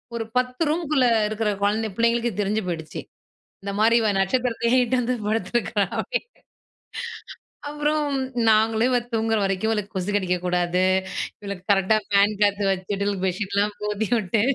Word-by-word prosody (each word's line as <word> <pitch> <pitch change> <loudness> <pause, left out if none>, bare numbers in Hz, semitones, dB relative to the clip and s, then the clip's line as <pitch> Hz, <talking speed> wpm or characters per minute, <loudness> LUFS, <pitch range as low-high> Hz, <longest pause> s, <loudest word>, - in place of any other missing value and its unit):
ஒரு 230 -1 -3
10 250 +2 -1
ரூம்க்குள்ள 305 -5 +1 0.2
இருக்கற 215 0 -1
கொழந்த 215 +2 +1
புள்ளைங்களுக்கு 235 +1 +1
தெரிஞ்சு 205 +2 0
போய்டுச்சு. 160 -3 -5 0.6
இந்த 200 - -4
மாரி 230 +2 +4
இவ 220 - +1
நட்சத்திரத்தயே 240 +3 +1
இட்டாந்து 250 0 0
வந்து 215 -3 -7
படுத்திருக்றா 220 -1 0
அப்படினு. - - -2 1.4
அப்புறம் 295 +1 0 0.4
நாங்களும் 220 +2 +3
இவள் 245 -1 0
தூங்குற 225 0 +1
வரைக்கும், 195 +3 0
இவளுக்கு 210 -2 -2
கொசு 190 +2 -2
கடிக்க 185 -3 +1
கூடாது, 180 0 +1 0.6
இவளுக்கு 200 -3 -7
கரெக்ட்டா 195 +2 +3
ஃபேன் 200 +1 +3
காத்து 205 0 +2
வச்சுட்டு, 200 +2 -2
பெட்ஷீட்லாம் 200 +2 -1
போத்தி 210 +1 -1
விட்டு, 210 +1 0
215 Hz, 135 wpm, -23 LUFS, 200-235 Hz, 1.4 s, மாரி